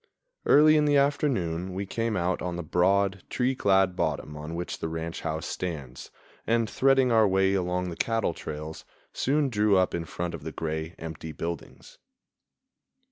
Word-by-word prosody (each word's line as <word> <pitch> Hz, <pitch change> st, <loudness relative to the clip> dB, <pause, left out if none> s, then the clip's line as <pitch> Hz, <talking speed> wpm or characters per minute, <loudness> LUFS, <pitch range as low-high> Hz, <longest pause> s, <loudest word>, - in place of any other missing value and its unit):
Early 155 Hz, +1 st, +7 dB
in 150 Hz, -, +3 dB
the 145 Hz, -1 st, +4 dB
afternoon 95 Hz, -, 0 dB
we 100 Hz, +1 st, -2 dB
came 115 Hz, +1 st, -2 dB
out 90 Hz, 0 st, 0 dB
on 90 Hz, -1 st, -3 dB
the 85 Hz, -, -4 dB
broad, 95 Hz, +3 st, +2 dB
tree 125 Hz, +1 st, +1 dB
clad 95 Hz, -6 st, +3 dB
bottom 75 Hz, -3 st, -2 dB
on 75 Hz, +2 st, -6 dB
which 85 Hz, +1 st, -4 dB
the -, -, -2 dB
ranch 80 Hz, +1 st, -4 dB
house 80 Hz, +1 st, -3 dB
stands, 70 Hz, -8 st, -5 dB, 0.4 s
and, 115 Hz, 0 st, +2 dB
threading 135 Hz, +1 st, +3 dB
our 110 Hz, -2 st, +5 dB
way 95 Hz, 0 st, +2 dB
along 90 Hz, -1 st, -1 dB
the -, -, -6 dB
cattle 115 Hz, -4 st, 0 dB
trails, 75 Hz, +1 st, -7 dB, 0.3 s
soon 145 Hz, +2 st, +1 dB
drew 105 Hz, -3 st, +3 dB
up 95 Hz, -1 st, +2 dB
in 85 Hz, -1 st, -2 dB
front 85 Hz, +1 st, -4 dB
of 85 Hz, -, -6 dB
the 80 Hz, -, -5 dB
gray, 80 Hz, +1 st, -4 dB
empty 80 Hz, -1 st, -7 dB
buildings. 85 Hz, 0 st, -7 dB
90 Hz, 170 wpm, -27 LUFS, 80-115 Hz, 0.4 s, Early